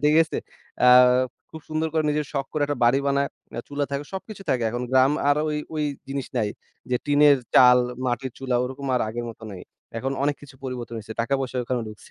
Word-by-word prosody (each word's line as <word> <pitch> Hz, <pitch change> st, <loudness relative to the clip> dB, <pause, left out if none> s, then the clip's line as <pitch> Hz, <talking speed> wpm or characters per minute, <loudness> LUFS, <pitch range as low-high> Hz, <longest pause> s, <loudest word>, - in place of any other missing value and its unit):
ঠিক 150 Hz, +1 st, +5 dB
আছে? 160 Hz, -, -4 dB, 0.5 s
আ -, -, +7 dB, 0.6 s
খুব 160 Hz, -, -9 dB
সুন্দর 155 Hz, +1 st, -1 dB
করে 160 Hz, -1 st, +2 dB
নিজের 150 Hz, -1 st, -1 dB
শখ 135 Hz, -2 st, -1 dB
করে 150 Hz, -, 0 dB
একটা 145 Hz, -3 st, -3 dB
বাড়ি 120 Hz, +3 st, +4 dB
বানায়। 140 Hz, 0 st, +1 dB, 0.3 s
আ -, -, -1 dB
চুলা 145 Hz, 0 st, -1 dB
থাকে, 140 Hz, +1 st, -3 dB
সবকিছু 195 Hz, +1 st, -7 dB
থাকে। 125 Hz, -3 st, +1 dB
এখন 120 Hz, +1 st, -3 dB
গ্রাম 130 Hz, +2 st, +5 dB, 0.2 s
আর 145 Hz, -, +4 dB
ওই 150 Hz, -, -1 dB, 0.2 s
ওই 150 Hz, -1 st, 0 dB, 0.2 s
জিনিস 135 Hz, -1 st, -3 dB
নাই। 110 Hz, -3 st, +1 dB, 0.4 s
যে 125 Hz, -, +3 dB
টিনের 145 Hz, 0 st, +6 dB, 0.2 s
চাল, 125 Hz, -1 st, +8 dB, 0.3 s
মাটির 125 Hz, +1 st, -2 dB
চুলা, 130 Hz, -2 st, -2 dB
ওরকম 130 Hz, +2 st, -5 dB
আর 125 Hz, -, +1 dB
আগের 120 Hz, +2 st, -4 dB
মত 115 Hz, -, -15 dB
নাই। 90 Hz, -, -9 dB, 0.4 s
এখন 135 Hz, +3 st, -2 dB
অনেক 145 Hz, 0 st, +1 dB
কিছু 140 Hz, -2 st, -13 dB
পরিবর্তন 125 Hz, -2 st, -5 dB
হইছে। 110 Hz, +1 st, -8 dB
টাকা-পয়সা 130 Hz, +1 st, -1 dB
ওখানে 125 Hz, 0 st, -1 dB
ঢুকছে 105 Hz, -1 st, -13 dB
135 Hz, 210 wpm, -24 LUFS, 125-145 Hz, 0.6 s, চাল